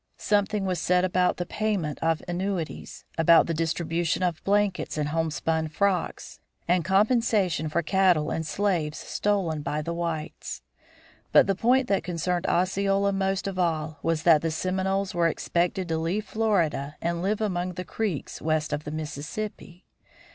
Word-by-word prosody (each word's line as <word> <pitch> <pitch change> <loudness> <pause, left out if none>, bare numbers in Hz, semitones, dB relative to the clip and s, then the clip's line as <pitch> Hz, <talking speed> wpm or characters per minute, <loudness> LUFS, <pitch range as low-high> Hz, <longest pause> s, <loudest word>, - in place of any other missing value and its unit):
Something 205 -1 +1
was 185 -3 -1
said 180 +2 +2
about 180 0 +1
the 175 - -2
payment 200 -8 -2
of 165 -1 +1
annuities, 175 -1 -4
about 165 0 +6
the 165 - -2
distribution 165 +2 -1
of 175 -3 -1
blankets 200 -4 +1
and 150 -1 -1
homespun 160 0 -1
frocks, 185 +3 -1 0.3
and 175 0 +2
compensation 195 - +2
for 170 +3 0
cattle 180 -4 +3
and 160 - -1
slaves 165 -3 -1
stolen 190 -7 -1
by 150 0 -2
the 170 - -3
whites. 165 -2 -4 0.7
But - - +7
the 195 - +1
point 250 +6 +2
that 195 - +1
concerned 175 0 -1
Osceola 195 +2 +1
most 195 0 0
of 195 -2 -3
all 155 -3 -1
was 165 -1 0
that 160 -3 +6
the 165 - 0
Seminoles 190 +4 -1
were 170 -1 +3
expected 175 +2 -1
to 160 0 0
leave 180 +7 -1
Florida 175 -10 0
and 170 0 -2
live 200 +3 0
among 180 -4 -1
the 180 +1 -6
Creeks 205 -10 -3
west 155 -1 0
of 150 +1 -3
the 150 - -5
Mississippi! 160 +5 -6
175 Hz, 155 wpm, -26 LUFS, 160-195 Hz, 0.7 s, But